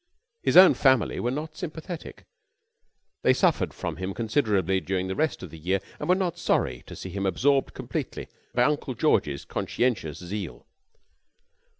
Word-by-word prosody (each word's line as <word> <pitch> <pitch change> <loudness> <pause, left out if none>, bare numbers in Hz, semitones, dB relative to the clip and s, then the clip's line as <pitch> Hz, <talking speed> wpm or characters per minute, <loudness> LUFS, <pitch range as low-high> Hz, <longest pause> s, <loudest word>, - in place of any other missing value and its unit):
His - - +3
own 185 0 +10
family 130 -5 +3
were 120 - 0
not 155 +4 -4
sympathetic. 170 -1 -7 1.0
They - - +5
suffered - - +2
from - - -5
him 95 +1 -4
considerably 105 - +1
during 95 0 -2
the 95 - -3
rest 155 -8 -1
of 90 - -8
the 80 - -10
year 95 +5 0 0.2
and - - -4
were 180 - +6
not 175 -2 -2
sorry 65 - 0
to - - -9
see 95 - -7
him 100 +1 -2
absorbed 135 +9 +1
completely - - -5 0.3
by 120 - +4
Uncle 140 -2 0
George's 75 - +1
conscientious 110 - -1
zeal. 90 - -6
115 Hz, 160 wpm, -26 LUFS, 95-150 Hz, 1.0 s, own